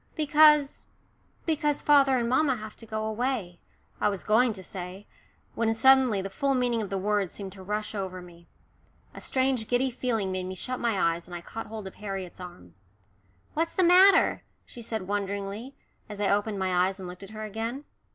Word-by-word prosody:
"Because" 300 Hz, -1 st, +4 dB, 0.6 s
"because 295 Hz, -3 st, 0 dB
father 275 Hz, -3 st, +5 dB
and 235 Hz, -1 st, 0 dB
mamma 265 Hz, +2 st, +2 dB
have 215 Hz, -1 st, -9 dB
to 225 Hz, -, -12 dB
go 215 Hz, 0 st, -3 dB
away," 220 Hz, -6 st, -2 dB, 0.4 s
I -, -, +2 dB
was 200 Hz, -2 st, -4 dB
going 230 Hz, +3 st, +3 dB
to 190 Hz, -2 st, -10 dB
say, 185 Hz, +2 st, -8 dB, 0.5 s
when 225 Hz, -1 st, 0 dB
suddenly 260 Hz, -5 st, +4 dB
the 195 Hz, -, -4 dB
full 275 Hz, +3 st, 0 dB
meaning 245 Hz, -2 st, +1 dB
of 205 Hz, -, -5 dB
the 195 Hz, -, -2 dB
words 205 Hz, -1 st, 0 dB
seemed 195 Hz, -2 st, -7 dB
to 190 Hz, 0 st, -12 dB
rush 210 Hz, +3 st, -3 dB
over 190 Hz, -3 st, -4 dB
me. 170 Hz, -1 st, -15 dB, 0.7 s
A -, -, -10 dB
strange 260 Hz, -4 st, 0 dB
giddy 255 Hz, +2 st, +1 dB
feeling 230 Hz, -6 st, -2 dB
made 185 Hz, 0 st, -3 dB
me 185 Hz, -, -5 dB
shut 255 Hz, +7 st, -4 dB
my 230 Hz, -5 st, 0 dB
eyes 170 Hz, 0 st, 0 dB
and 175 Hz, -, -8 dB
I 175 Hz, -, -6 dB
caught 225 Hz, +6 st, -7 dB
hold 215 Hz, -1 st, -7 dB
of 190 Hz, -, -8 dB
Harriet's 195 Hz, -4 st, -6 dB
arm. 90 Hz, -, -11 dB, 0.8 s
"What's 330 Hz, +2 st, -1 dB
the 375 Hz, -, +3 dB
matter?" 370 Hz, +3 st, +6 dB, 0.2 s
she 240 Hz, -, -11 dB
said 220 Hz, -4 st, -4 dB
wonderingly, 200 Hz, +5 st, -4 dB, 0.3 s
as 205 Hz, -1 st, -8 dB
I 205 Hz, -1 st, +1 dB
opened 205 Hz, +1 st, 0 dB
my 185 Hz, -1 st, +2 dB
eyes 190 Hz, 0 st, -5 dB
and 190 Hz, -2 st, -8 dB
looked 180 Hz, +1 st, -9 dB
at 195 Hz, -, -10 dB
her 215 Hz, 0 st, -7 dB
again. 225 Hz, +6 st, -4 dB
215 Hz, 195 wpm, -27 LUFS, 190-255 Hz, 0.8 s, matter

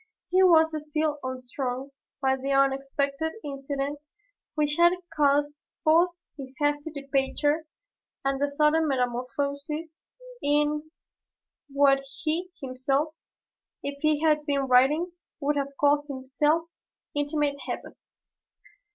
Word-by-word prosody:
He 370 Hz, +1 st, +5 dB
was 320 Hz, -3 st, +6 dB, 0.2 s
still 305 Hz, -1 st, 0 dB
unstrung 260 Hz, +1 st, -4 dB, 0.3 s
by 265 Hz, 0 st, +3 dB
the 270 Hz, +1 st, -3 dB
unexpected 275 Hz, +3 st, +1 dB
incident 280 Hz, 0 st, -3 dB, 0.6 s
which 295 Hz, -1 st, +1 dB
had 345 Hz, +1 st, +6 dB, 0.2 s
caused 290 Hz, 0 st, +2 dB, 0.3 s
both 330 Hz, +3 st, +5 dB, 0.3 s
his 265 Hz, -2 st, -9 dB
hasty 290 Hz, +1 st, 0 dB
departure 290 Hz, +2 st, 0 dB, 0.6 s
and 275 Hz, 0 st, 0 dB
the 285 Hz, -, +2 dB
sudden 300 Hz, +2 st, +3 dB
metamorphosis 280 Hz, +5 st, -2 dB, 0.5 s
in 295 Hz, +1 st, +1 dB, 0.8 s
what 280 Hz, 0 st, +4 dB, 0.2 s
he 335 Hz, +3 st, -1 dB
himself, 270 Hz, +4 st, 0 dB, 0.7 s
if 280 Hz, 0 st, -4 dB
he 305 Hz, -1 st, +2 dB
had 305 Hz, -2 st, +3 dB
been 280 Hz, -1 st, +1 dB
writing, 270 Hz, +7 st, +4 dB, 0.3 s
would 295 Hz, 0 st, +1 dB
have 280 Hz, -1 st, -3 dB
called 290 Hz, 0 st, +3 dB
his 265 Hz, -1 st, -8 dB, 0.8 s
"intimate 290 Hz, -1 st, 0 dB
heaven." -, -, -5 dB
285 Hz, 110 wpm, -27 LUFS, 275-300 Hz, 0.8 s, was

